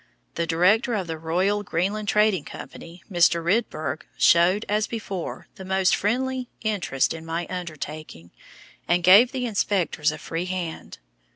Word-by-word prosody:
The 170 - -2
director 210 +9 +3
of 195 -3 -2
the 160 -1 -5
Royal 185 +6 0
Greenland 205 +3 -2
Trading 210 -5 +2
Company, 170 +4 -11
Mr. 170 -1 +3
Rydberg, 165 - -1 0.2
showed, 180 +5 +4
as 210 +1 0
before, 200 -6 -5
the 190 - -8
most 190 0 +2
friendly 255 +4 -1
interest 200 -11 0
in 160 0 -8
my 165 +1 -3
undertaking, 155 - -7 0.6
and 175 0 +2
gave 200 +8 +7
the 260 -2 -3
inspectors 200 -8 0
a 155 - -7
free 165 +3 -4
hand. 180 -3 -5
185 Hz, 145 wpm, -24 LUFS, 165-210 Hz, 0.6 s, gave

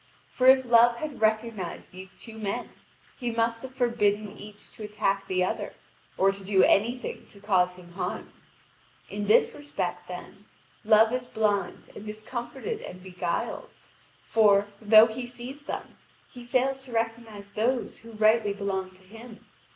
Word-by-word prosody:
For 255 - +2
if 260 0 +7
Love 235 0 +6
had 290 -1 -6
recognised 220 -4 -1
these 185 0 -11
two 225 -2 -11
men, 200 -2 -3 0.5
he 245 -3 -2
must 230 0 0
have 260 0 -9
forbidden 215 -5 +1
each 210 0 -12
to - - -14
attack 200 -2 -1
the 185 -1 +1
other, 185 - -3 0.4
or 195 +1 +4
to 195 0 -9
do 190 -1 +3
any 230 +5 +3
thing - - -7
to 200 - -17
cause 185 -3 +2
him 175 -1 -14
harm. 175 - -5 0.8
In 205 0 -3
this 215 - +4
respect, 290 0 -4
then, - - -9 0.4
Love 220 +2 +5
is 250 -1 -2
blind 210 -3 -1
and 210 - -8
discomfited 240 - -5
and 180 0 -9
beguiled; 185 - -3 0.5
for, 205 -2 +4
though 215 +1 +8
he 235 +2 -5
sees 250 +4 -9
them, - - -7 0.3
he 245 - -10
fails 260 +2 0
to 255 - -12
recognise 225 -3 -3
those 235 +4 -1
who 230 0 -13
rightly 215 -1 +3
belong 195 -2 -3
to 185 - -21
him. 225 +4 -13
220 Hz, 160 wpm, -27 LUFS, 200-240 Hz, 0.8 s, though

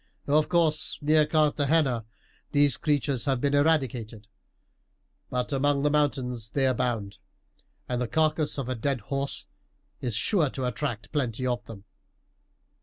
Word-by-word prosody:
Of 150 +2 +2
course, 165 -3 +1
near 155 0 +4
Carthagena 150 -5 +2 0.5
these 145 -3 +4
creatures 140 -5 0
have 135 -3 +1
been 140 +2 0
eradicated; 130 -8 0 1.0
but 125 +2 -2
among 140 +1 +1
the 145 - +3
mountains 125 -6 0
they 135 +2 +1
abound, 120 -6 -1 0.7
and 125 -1 -2
the 125 - -1
carcass 155 +1 +1
of 135 -3 -3
a 130 - -1
dead 130 +1 -1
horse 140 +5 -2 0.5
is 120 -4 -2
sure 155 - +2
to 130 -1 -4
attract 115 -2 -3
plenty 130 -5 -1
of 120 -1 -1
them. 105 -3 -10
135 Hz, 135 wpm, -27 LUFS, 120-150 Hz, 1.0 s, near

